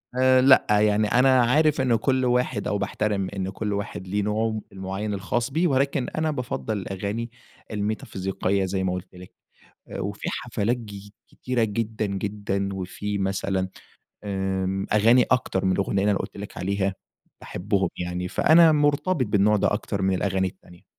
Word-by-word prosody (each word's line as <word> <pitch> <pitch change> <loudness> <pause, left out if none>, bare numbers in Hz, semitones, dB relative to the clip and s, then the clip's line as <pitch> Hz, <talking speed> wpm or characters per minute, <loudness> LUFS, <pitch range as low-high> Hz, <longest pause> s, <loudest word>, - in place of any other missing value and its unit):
آآ، 130 0 +5
لأ، 130 0 +6
يعني 105 0 +3
أنا 130 +3 +4
عارف 150 +4 +3
إنّه 125 -3 +3
كل 130 +3 +1
واحد 125 -3 0
أو 105 - 0
باحترم 100 -1 -1
إن 95 -1 -2
كل 105 +1 -3
واحد 100 -2 -5
ليه 100 +3 0
نوعه 110 +1 -1
المعيّن 95 +2 -4
الخاص 110 +5 -1
بيه، 165 +5 +2
ولكن 140 -2 +1
أنا 155 0 -1
بافضل 120 -5 -3
الأغاني 100 +4 -4 0.4
الميتافيزيقية 100 -2 -2
زي 95 0 -2
ما 90 -1 0
قلت 90 +1 -7
لِك. 90 0 -12 0.7
وفي - - -4
حفلات 115 +4 -1
ج 105 -3 -10 0.2
كتيرة 125 -2 -2
جدًا، 110 0 -2
جدًا، 100 0 -2
وفي 95 +2 -4
مثلًا 95 -1 -1 0.5
آمم، 95 -1 -2
أغاني 115 +4 +5
أكتر 110 -7 +1
من 95 - +3
الأغنية 95 +1 0
اللي 105 +1 +3
أنا 100 - 0
قلت - - -6
لك 100 0 -8
عليها 95 +1 -1 0.5
باحبهم 95 0 -1
يعني، 90 0 -3
فأنا 160 - +5
مرتبط 145 +1 +2
بالنوع 105 0 +3
ده - - +1
أكتر 105 -1 -2
من 95 0 +2
الأغاني 95 0 0
التانية. 90 -1 -14
105 Hz, 155 wpm, -24 LUFS, 95-120 Hz, 0.7 s, لأ